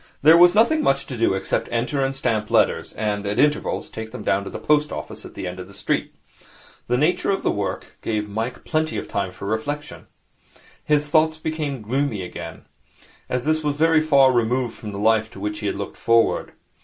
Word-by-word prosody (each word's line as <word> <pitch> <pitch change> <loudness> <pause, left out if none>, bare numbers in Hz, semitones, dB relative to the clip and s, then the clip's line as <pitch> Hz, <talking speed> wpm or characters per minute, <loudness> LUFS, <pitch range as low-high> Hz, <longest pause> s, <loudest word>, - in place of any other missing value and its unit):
There 155 +3 +8
was 175 +2 +7
nothing 235 +9 +4
much 135 - +1
to 130 - -6
do 115 -4 +2
except 95 - -1
enter 125 +4 0
and 135 0 -1
stamp 110 -5 -1
letters, - - +2
and, 105 -1 -2
at 100 - -2
intervals, 150 +1 +1
take 110 0 -7
them 105 - -8
down 100 0 +1
to - - -5
the - - -6
post 150 0 +2
office - - -7
at - - -12
the - - -5
end 90 0 -5
of 90 - -7
the 100 - -14
street. - - -2 0.7
The 125 - +1
nature 160 +6 +1
of 195 - 0
the - - +2
work 100 -1 -4
gave 105 -2 -2
Mike 110 +4 -4
plenty 155 0 -1
of - - -4
time 100 -3 -2
for 100 - -9
reflection. 145 +8 -4 0.8
His 150 -1 +1
thoughts 160 +1 +3
became 155 -6 -3
gloomy 125 -3 -1
again. 85 -2 -8 0.6
All 125 - 0
this 155 +5 0
was 145 -1 0
very 160 +1 +4
far 140 -4 +5
removed 120 +1 0
from 105 - -8
the 100 - -6
life 110 +1 +2
to - - -10
which 105 +1 -3
he - - -3
had - - -1
looked - - -6
forward. 115 0 +2
125 Hz, 210 wpm, -22 LUFS, 105-150 Hz, 0.8 s, There